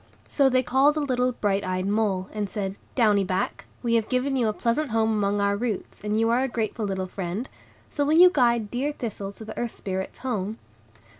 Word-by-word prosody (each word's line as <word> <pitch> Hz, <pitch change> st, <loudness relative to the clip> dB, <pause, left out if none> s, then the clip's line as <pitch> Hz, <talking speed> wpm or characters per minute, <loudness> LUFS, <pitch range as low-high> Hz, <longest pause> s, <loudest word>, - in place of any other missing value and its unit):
So 275 Hz, -2 st, +4 dB
they 255 Hz, 0 st, +2 dB
called 275 Hz, +5 st, +3 dB
a -, -, +2 dB
little 255 Hz, -3 st, +1 dB
bright 200 Hz, -3 st, 0 dB
eyed 185 Hz, 0 st, -2 dB
mole, 200 Hz, -2 st, 0 dB
and 210 Hz, -2 st, -2 dB
said, 195 Hz, -1 st, -3 dB, 0.2 s
"Downy 210 Hz, -5 st, +4 dB
Back, 185 Hz, 0 st, -2 dB, 0.2 s
we 235 Hz, -1 st, +1 dB
have 225 Hz, -2 st, +2 dB
given 260 Hz, +2 st, 0 dB
you 245 Hz, -4 st, +2 dB
a -, -, +2 dB
pleasant 240 Hz, +7 st, -1 dB
home 225 Hz, 0 st, +2 dB
among 205 Hz, -1 st, +1 dB
our 200 Hz, 0 st, +2 dB
roots, 220 Hz, -1 st, -4 dB
and 210 Hz, +1 st, 0 dB
you 225 Hz, 0 st, +3 dB
are 240 Hz, +2 st, +3 dB
a 265 Hz, -, +1 dB
grateful 225 Hz, -2 st, -2 dB
little 190 Hz, -1 st, -2 dB
friend; 185 Hz, +5 st, -4 dB, 0.4 s
so 290 Hz, -, 0 dB
will 300 Hz, +3 st, +3 dB
you 360 Hz, +1 st, +9 dB
guide 235 Hz, -5 st, +2 dB
dear 275 Hz, +5 st, -1 dB
Thistle 205 Hz, -6 st, -5 dB
to 220 Hz, -, -11 dB
the 215 Hz, -, -8 dB
Earth 240 Hz, -1 st, -3 dB
Spirits' 190 Hz, -1 st, -4 dB
home?" 215 Hz, -3 st, -2 dB
220 Hz, 215 wpm, -25 LUFS, 200-250 Hz, 0.4 s, you